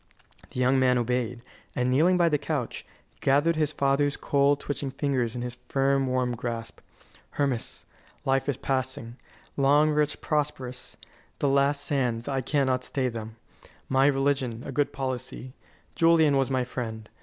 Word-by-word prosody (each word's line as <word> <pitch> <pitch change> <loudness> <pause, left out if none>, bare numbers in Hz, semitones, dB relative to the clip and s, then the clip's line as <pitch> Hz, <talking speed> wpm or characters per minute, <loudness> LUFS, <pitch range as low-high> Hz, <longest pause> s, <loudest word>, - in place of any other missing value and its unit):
The - - -6
young 130 +1 +3
man 125 -1 +4
obeyed, 120 0 -1 0.3
and, 125 0 +1
kneeling 165 +8 +4
by 170 -1 +4
the 150 -3 +2
couch, 145 -4 -3 0.3
gathered 145 +5 +3
his 155 -1 +1
father's 140 0 +1
cold, 140 0 +2
twitching 145 -1 -3
fingers 130 -4 -1
in 120 - -3
his 120 0 -6
firm, 135 0 +2
warm 125 -1 0
grasp. 115 -1 -5 0.6
"Hermas, 135 -5 -1 0.4
life 135 +1 +1
is 135 - -1
passing 130 -3 -3 0.4
long, 145 +2 +4
rich, 150 0 +1
prosperous; 135 -4 -3 0.4
the 145 - 0
last 140 +1 +2
sands, 125 -6 0
I 135 -2 0
cannot 130 -2 +1
stay 130 -1 -1
them. 110 -1 -7 0.5
My 135 +1 +4
religion, 135 -4 0
a - - -5
good 145 +1 0
policy 130 -1 -5 0.4
Julian 165 -3 +4
was 135 -1 +2
my 130 -1 +1
friend. 110 -3 -5
135 Hz, 150 wpm, -27 LUFS, 125-145 Hz, 0.6 s, man